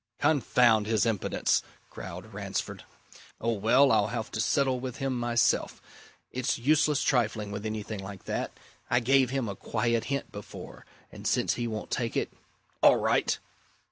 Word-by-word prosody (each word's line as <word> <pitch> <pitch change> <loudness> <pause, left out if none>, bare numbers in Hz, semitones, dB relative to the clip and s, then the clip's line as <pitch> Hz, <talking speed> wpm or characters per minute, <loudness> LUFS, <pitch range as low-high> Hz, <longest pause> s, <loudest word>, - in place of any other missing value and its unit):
"Confound 120 -7 +3
his 110 0 +2
impudence!" 110 -4 +1 0.3
growled - - -8
Ransford. - - -4 0.5
"Oh, 115 - 0
well! 125 +6 +4
I'll 100 - +4
have 115 0 -4
to - - -1
settle 135 -3 +2
with 130 0 -5
him 135 -1 -1
myself. 120 -1 +1 0.5
It's 130 +1 -1
useless 150 +3 +3
trifling 110 -5 +1
with 105 +1 -4
anything 110 -1 -4
like 95 0 -8
that. - - -2 0.4
I 120 - +4
gave 130 +1 +3
him 130 -3 -1
a 100 - -4
quiet 115 +3 -1
hint 140 0 -3
before. 105 0 -10 0.2
And - - -6
since - - +2
he 120 -1 -2
won't 110 -1 -5
take 115 -2 -1
it - - -1 0.5
all - - +7
right!" - - +1
120 Hz, 155 wpm, -28 LUFS, 110-130 Hz, 0.5 s, all